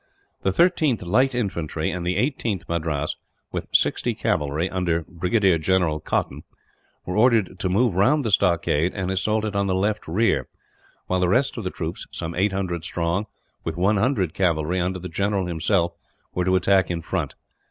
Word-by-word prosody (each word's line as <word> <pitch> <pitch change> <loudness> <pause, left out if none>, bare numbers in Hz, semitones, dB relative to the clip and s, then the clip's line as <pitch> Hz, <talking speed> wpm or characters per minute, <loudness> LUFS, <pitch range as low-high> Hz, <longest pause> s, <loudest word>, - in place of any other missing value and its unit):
The - - +1
13th 150 - +2
Light 125 +8 +2
Infantry 85 -9 -2
and 90 - -4
the 90 +1 0
18th 115 - -1
Madras, 80 -3 -2 0.3
with - - -4
60 - - +2
cavalry, 75 +4 0
under 85 -3 -1
Brigadier 90 0 +2
General 85 -2 +1
Cotton, 75 -1 -2 0.6
were 90 - -3
ordered 110 -3 +3
to 95 - -1
move 110 +3 +2
round 130 - +3
the 110 - 0
stockade 90 -3 +2
and 95 -2 -2
assault 105 +3 0
it 105 -1 -3
on 100 0 +1
the 95 - +1
left 105 +3 -1
rear; 105 +8 +1 0.6
while 95 - 0
the 90 -1 +2
rest 130 +7 +2
of 115 - -5
the 90 - -2
troops, 80 -2 -5
some 85 -1 -5
800 95 -2 -1
strong, 85 +5 -1 0.4
with 80 0 -4
100 100 - +1
cavalry 85 -1 +1
under 90 +1 -1
the 90 0 -6
general 100 +3 0
himself, 85 +1 0 0.4
were 90 - 0
to 95 0 +3
attack 95 -1 +3
in 85 -2 -3
front. - - -3
95 Hz, 170 wpm, -23 LUFS, 85-105 Hz, 0.6 s, ordered